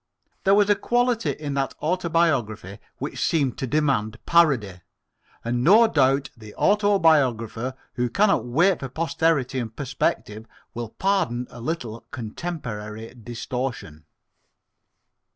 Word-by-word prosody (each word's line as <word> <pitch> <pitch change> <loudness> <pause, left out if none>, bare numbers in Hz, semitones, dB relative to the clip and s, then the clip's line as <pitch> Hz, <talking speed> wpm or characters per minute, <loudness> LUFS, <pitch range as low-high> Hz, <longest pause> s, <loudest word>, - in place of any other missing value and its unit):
There 195 +1 +6
was 205 -1 +4
a 205 - +5
quality 240 +1 +1
in 145 -2 -4
that 135 -1 -1
autobiography 155 - 0 0.2
which - - -4
seemed 140 -7 0
to 130 - -2
demand 125 -7 0
parody, 130 - +3 0.6
and 120 +1 -1
no 215 - +7
doubt 140 -6 +2
the 110 -3 -13
autobiographer 145 - +2 0.2
who 125 0 -1
cannot 200 - +2
wait 170 +9 +2
for 135 - -5
posterity 160 -3 0
and 110 -2 -5
perspective 115 -5 -2 0.3
will 120 -1 -5
pardon 175 - 0
a 120 - -10
little 120 -6 -5
contemporary 115 -5 -6
distortion. 120 - -5
135 Hz, 115 wpm, -24 LUFS, 115-170 Hz, 0.6 s, no